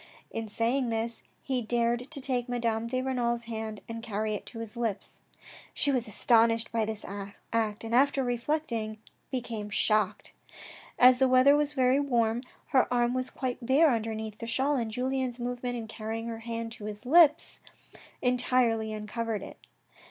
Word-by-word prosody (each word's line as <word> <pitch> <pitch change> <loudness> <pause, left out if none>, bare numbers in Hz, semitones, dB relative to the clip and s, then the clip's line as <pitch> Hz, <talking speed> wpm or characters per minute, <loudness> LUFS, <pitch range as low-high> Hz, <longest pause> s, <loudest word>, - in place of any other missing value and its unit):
In 225 -1 -4
saying 235 +4 0
this, 230 +1 -2 0.2
he 260 -2 -1
dared 240 +2 0
to 320 - -6
take 255 -2 -2
Madame 230 -2 -1
de 255 +2 -1
Renal's 240 -2 0
hand 220 -2 -5
and 230 0 -6
carry 215 -1 -2
it 210 - -5
to 230 - -9
his 225 0 -6
lips. 225 -4 -3 0.6
She 285 - +1
was 250 -3 0
astonished 230 +1 +3
at 225 -2 +1
this 220 -1 -5
act, 205 +2 -3
and 225 0 -4
after 275 +2 +4
reflecting, 240 -3 -2 0.3
became 230 -5 -4
shocked. 210 -1 +1 0.6
As 250 0 +7
the 265 - +5
weather 255 +2 +6
was 295 0 +1
very 260 0 +3
warm, 240 -4 +1 0.3
her 260 -2 +3
arm 240 0 +2
was 255 0 -2
quite 255 -1 -4
bare 275 +5 +5
underneath 220 -1 -3
the 230 - -5
shawl, 265 +5 +1
and 235 -4 -1
Julien's 255 +1 -1
movement 245 0 -3
in 225 -1 -6
carrying 225 +1 -5
her 225 -1 -5
hand 230 0 -4
to 215 -2 -8
his 210 +3 -6
lips 320 +2 +5 0.6
entirely 245 -3 +2
uncovered 215 0 -3
it. - - -10
235 Hz, 165 wpm, -29 LUFS, 225-255 Hz, 0.6 s, As